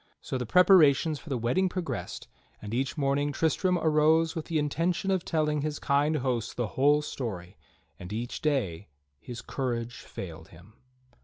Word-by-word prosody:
So 130 Hz, -, -4 dB
the 125 Hz, -, -4 dB
preparations 160 Hz, -, +5 dB
for 160 Hz, -, -12 dB
the 135 Hz, -, -1 dB
wedding 125 Hz, +12 st, +1 dB
pro 180 Hz, 0 st, -3 dB
gressed; -, -, -5 dB, 0.3 s
and 105 Hz, +1 st, -7 dB
each 135 Hz, +5 st, -1 dB
morning 145 Hz, 0 st, +1 dB
Tristram 170 Hz, +5 st, +1 dB
arose 160 Hz, +1 st, +3 dB
with 160 Hz, -, -4 dB
the 165 Hz, -, -1 dB
intention 165 Hz, +6 st, 0 dB
of 185 Hz, -3 st, +1 dB
telling 150 Hz, -2 st, 0 dB
his 150 Hz, 0 st, -2 dB
kind 145 Hz, +2 st, +1 dB
hosts 125 Hz, -5 st, -2 dB
the 120 Hz, -3 st, -2 dB
whole 145 Hz, +3 st, +3 dB
story, 95 Hz, -11 st, -5 dB, 0.4 s
and 90 Hz, +2 st, -9 dB
each 115 Hz, +3 st, -4 dB
day 105 Hz, -, -1 dB, 0.3 s
his 120 Hz, +6 st, -8 dB
courage 120 Hz, -3 st, -3 dB
failed -, -, -9 dB
him. 90 Hz, +7 st, -17 dB
145 Hz, 165 wpm, -28 LUFS, 120-160 Hz, 0.4 s, preparations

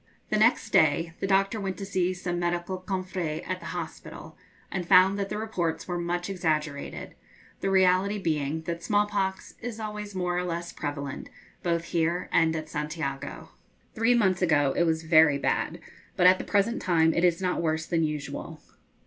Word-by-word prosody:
The -, -, +3 dB
next -, -, +3 dB
day 165 Hz, 0 st, +3 dB
the 195 Hz, -, -1 dB
doctor 195 Hz, +3 st, +2 dB
went 190 Hz, -1 st, -3 dB
to 195 Hz, -, -5 dB
see 185 Hz, -2 st, 0 dB
some 175 Hz, -1 st, -3 dB
medical 175 Hz, +2 st, -2 dB
confrères 185 Hz, -4 st, -3 dB
at -, -, -2 dB
the -, -, -9 dB
hospital, -, -, -7 dB, 0.4 s
and 190 Hz, -, -2 dB
found 190 Hz, +2 st, +6 dB
that 200 Hz, 0 st, -2 dB
the 210 Hz, -, -3 dB
reports 190 Hz, -7 st, -2 dB
were 175 Hz, -1 st, -2 dB
much 175 Hz, +1 st, -2 dB
exaggerated, 155 Hz, -6 st, -2 dB, 0.5 s
the 195 Hz, -, -1 dB
reality 190 Hz, +2 st, +3 dB
being 160 Hz, -4 st, -1 dB
that 170 Hz, 0 st, -4 dB
small 205 Hz, -1 st, +2 dB
pox 195 Hz, -2 st, -2 dB
is 230 Hz, -2 st, -5 dB
always 210 Hz, -2 st, -6 dB
more 180 Hz, -1 st, -1 dB
or 180 Hz, -, 0 dB
less 170 Hz, -1 st, -4 dB
prevalent 145 Hz, -2 st, -5 dB, 0.3 s
both 170 Hz, -1 st, 0 dB
here 170 Hz, +1 st, -1 dB
and 160 Hz, -1 st, +3 dB
at 155 Hz, -1 st, -4 dB
Santiago. 150 Hz, -2 st, -4 dB, 0.4 s
Three 225 Hz, +2 st, +3 dB
months 190 Hz, -6 st, +2 dB
ago 145 Hz, -6 st, +3 dB
it 170 Hz, -, +3 dB
was 160 Hz, -1 st, 0 dB
very 160 Hz, -3 st, +5 dB
bad, 140 Hz, -, -1 dB, 0.4 s
but 180 Hz, -, +2 dB
at 185 Hz, +1 st, +7 dB
the -, -, -5 dB
present 210 Hz, +3 st, +1 dB
time 165 Hz, -3 st, +3 dB
it 170 Hz, -, 0 dB
is 175 Hz, -2 st, +3 dB
not 180 Hz, -2 st, -1 dB
worse 160 Hz, -1 st, 0 dB
than 165 Hz, -1 st, 0 dB
usual. 150 Hz, -2 st, -4 dB
175 Hz, 180 wpm, -27 LUFS, 160-190 Hz, 0.5 s, at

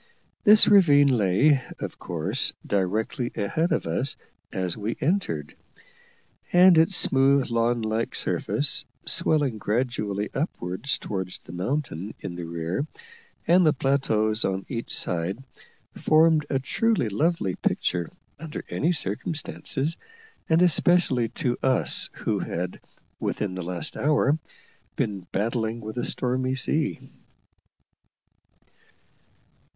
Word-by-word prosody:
This 210 Hz, +1 st, +7 dB
ravine 145 Hz, -9 st, +5 dB
lay, 120 Hz, +8 st, +3 dB, 0.2 s
of -, -, -7 dB
course, -, -, -2 dB
directly 110 Hz, +6 st, -1 dB
ahead 155 Hz, -, -1 dB
of -, -, 0 dB
us 105 Hz, +12 st, -1 dB, 0.4 s
as 90 Hz, -2 st, 0 dB
we 110 Hz, +2 st, -4 dB
entered; 140 Hz, -, -1 dB, 1.0 s
and 180 Hz, 0 st, +7 dB
its 165 Hz, +4 st, +5 dB
smooth, 135 Hz, -3 st, +4 dB
lawn 115 Hz, 0 st, +1 dB
like 110 Hz, +1 st, -2 dB
surface, -, -, +2 dB, 0.2 s
swelling 140 Hz, -8 st, +1 dB
gradually 105 Hz, -3 st, -2 dB
upwards 135 Hz, -, -2 dB
towards 95 Hz, -3 st, -5 dB
the -, -, -14 dB
mountain 100 Hz, -, -3 dB
in 85 Hz, -, -6 dB
the 85 Hz, -1 st, -6 dB
rear 85 Hz, -, -3 dB, 0.6 s
and 180 Hz, +2 st, +5 dB
the 155 Hz, -3 st, +4 dB
plateaus 110 Hz, -6 st, +1 dB
on 95 Hz, 0 st, -2 dB
each 120 Hz, -3 st, -5 dB
side, 90 Hz, +8 st, -1 dB, 0.5 s
formed 155 Hz, -1 st, +3 dB
a 135 Hz, -, +1 dB
truly 210 Hz, -, 0 dB
lovely 110 Hz, -, 0 dB
picture 90 Hz, -1 st, -1 dB, 0.3 s
under 155 Hz, -1 st, -7 dB
any 165 Hz, -, +1 dB
circumstances, 150 Hz, -, -2 dB, 0.5 s
and 165 Hz, +2 st, +4 dB
especially 170 Hz, -8 st, +3 dB
to 125 Hz, -6 st, -2 dB
us 130 Hz, -, +2 dB
who -, -, -2 dB
had, 90 Hz, +2 st, -4 dB, 0.4 s
within 100 Hz, -3 st, -2 dB
the 95 Hz, -, -5 dB
last 90 Hz, 0 st, -1 dB
hour, 150 Hz, 0 st, +2 dB, 0.6 s
been 100 Hz, -4 st, -3 dB
battling 115 Hz, +2 st, -1 dB
with 110 Hz, -1 st, -7 dB
a -, -, -2 dB
stormy 130 Hz, +1 st, -1 dB
sea. 150 Hz, +4 st, -1 dB
120 Hz, 115 wpm, -25 LUFS, 100-150 Hz, 1.0 s, This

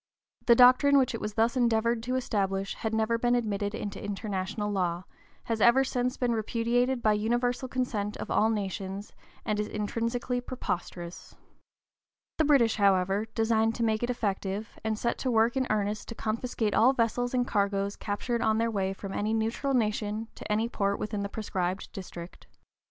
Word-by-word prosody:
The 235 Hz, -, +8 dB
doctrine 255 Hz, +4 st, +7 dB
which 260 Hz, -3 st, +3 dB
it 230 Hz, -, -4 dB
was 210 Hz, 0 st, -4 dB
thus 230 Hz, +3 st, +2 dB
endeavored 235 Hz, -1 st, +2 dB
to 250 Hz, +2 st, -2 dB
establish 195 Hz, -6 st, -1 dB
had 220 Hz, -, -3 dB
never 220 Hz, +1 st, +1 dB
been 240 Hz, +1 st, +2 dB
admitted 205 Hz, -3 st, -1 dB
into 200 Hz, -1 st, -5 dB
international 205 Hz, 0 st, -3 dB
law, 180 Hz, -3 st, -1 dB, 0.4 s
has 225 Hz, -2 st, -2 dB
ever 240 Hz, +4 st, +6 dB
since 250 Hz, -1 st, -1 dB
been 245 Hz, -2 st, +1 dB
repudiated 235 Hz, +3 st, 0 dB
by 215 Hz, -, +4 dB
universal 240 Hz, +4 st, 0 dB
consent 225 Hz, -5 st, -2 dB
of -, -, -6 dB
all 220 Hz, -, +3 dB
nations, 195 Hz, -1 st, -4 dB, 0.3 s
and 210 Hz, -1 st, 0 dB
is 210 Hz, -, -1 dB
intrinsically 230 Hz, +4 st, -2 dB
preposterous. 175 Hz, -8 st, -5 dB, 1.0 s
The 315 Hz, -, +4 dB
British, 255 Hz, -7 st, +4 dB
however, 195 Hz, +1 st, +2 dB
designed 225 Hz, 0 st, +2 dB
to 235 Hz, -, -1 dB
make 220 Hz, -1 st, +1 dB
it 240 Hz, -, -1 dB
effective, 205 Hz, -3 st, -2 dB
and 220 Hz, -1 st, -1 dB
set 235 Hz, -, -1 dB
to 260 Hz, -, -1 dB
work 230 Hz, +1 st, +3 dB
in 260 Hz, -1 st, 0 dB
earnest 210 Hz, 0 st, -1 dB
to 230 Hz, -, -7 dB
confiscate 220 Hz, -1 st, -2 dB
all 250 Hz, +4 st, +5 dB
vessels 245 Hz, +1 st, 0 dB
and 245 Hz, -1 st, +2 dB
cargoes 200 Hz, -1 st, 0 dB
captured 235 Hz, +3 st, -2 dB
on 220 Hz, 0 st, +2 dB
their 230 Hz, 0 st, +1 dB
way 195 Hz, -2 st, -1 dB
from 195 Hz, 0 st, -7 dB
any 215 Hz, +2 st, 0 dB
neutral 225 Hz, +5 st, 0 dB
nation 215 Hz, -1 st, -1 dB
to -, -, -7 dB
any 220 Hz, +2 st, +1 dB
port 200 Hz, -3 st, -1 dB
within 210 Hz, -1 st, -3 dB
the 200 Hz, -, -3 dB
proscribed 190 Hz, -3 st, -3 dB
district. 175 Hz, -3 st, -9 dB
220 Hz, 175 wpm, -28 LUFS, 205-240 Hz, 1.0 s, The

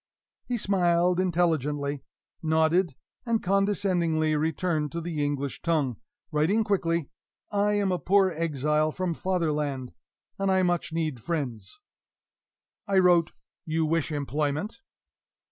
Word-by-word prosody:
He 245 Hz, -, -1 dB
smiled 180 Hz, -3 st, +2 dB
intelligently, 150 Hz, -6 st, 0 dB, 0.4 s
nodded, 160 Hz, 0 st, +2 dB, 0.3 s
and 230 Hz, -2 st, 0 dB
condescendingly 180 Hz, -5 st, +1 dB
returned 155 Hz, 0 st, 0 dB
to 170 Hz, -, -2 dB
the 160 Hz, -3 st, -2 dB
English 140 Hz, -1 st, -2 dB
tongue, 145 Hz, -9 st, 0 dB, 0.3 s
writing 165 Hz, +9 st, +2 dB
quickly, 170 Hz, -6 st, 0 dB, 0.4 s
"I 205 Hz, 0 st, +2 dB
am 200 Hz, -2 st, +1 dB
a 180 Hz, -, 0 dB
poor 195 Hz, 0 st, +3 dB
exile 155 Hz, -1 st, 0 dB
from 180 Hz, +1 st, -2 dB
Fatherland, 150 Hz, -8 st, -1 dB, 0.5 s
and 195 Hz, 0 st, +1 dB
I 190 Hz, 0 st, +3 dB
much 175 Hz, -2 st, 0 dB
need 155 Hz, -7 st, -2 dB
friends." 125 Hz, -, -4 dB, 1.1 s
I 195 Hz, -1 st, +2 dB
wrote: 175 Hz, -3 st, +4 dB, 0.3 s
"You 160 Hz, 0 st, 0 dB
wish 160 Hz, 0 st, 0 dB
employment?" 150 Hz, -, -2 dB
165 Hz, 115 wpm, -27 LUFS, 150-185 Hz, 1.1 s, wrote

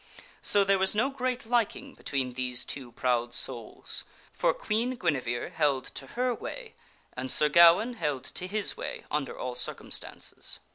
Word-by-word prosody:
So 205 Hz, -, +4 dB
there 195 Hz, 0 st, +3 dB
was 190 Hz, +2 st, +2 dB
no 235 Hz, +6 st, +2 dB
great 255 Hz, -2 st, -2 dB
liking 240 Hz, +4 st, 0 dB
between 130 Hz, -3 st, -3 dB
these 125 Hz, 0 st, -1 dB
two 130 Hz, -4 st, -7 dB
proud 120 Hz, -1 st, 0 dB
souls, 115 Hz, -3 st, +1 dB, 0.3 s
for -, -, +2 dB
Queen 235 Hz, +4 st, -1 dB
Guinevere 130 Hz, -, -1 dB
held 135 Hz, -3 st, +1 dB
to 135 Hz, -, -8 dB
her 250 Hz, 0 st, +2 dB
way 470 Hz, -, -7 dB, 0.4 s
and 130 Hz, +1 st, -4 dB
Sir 150 Hz, -, +7 dB
Gawaine 170 Hz, -, +6 dB
held 150 Hz, -, -2 dB
to 180 Hz, -, -4 dB
his 210 Hz, +2 st, 0 dB
way -, -, -6 dB
under 145 Hz, -2 st, -2 dB
all 125 Hz, -, -4 dB
circumstances. 125 Hz, 0 st, -2 dB
165 Hz, 155 wpm, -28 LUFS, -, 0.4 s, Sir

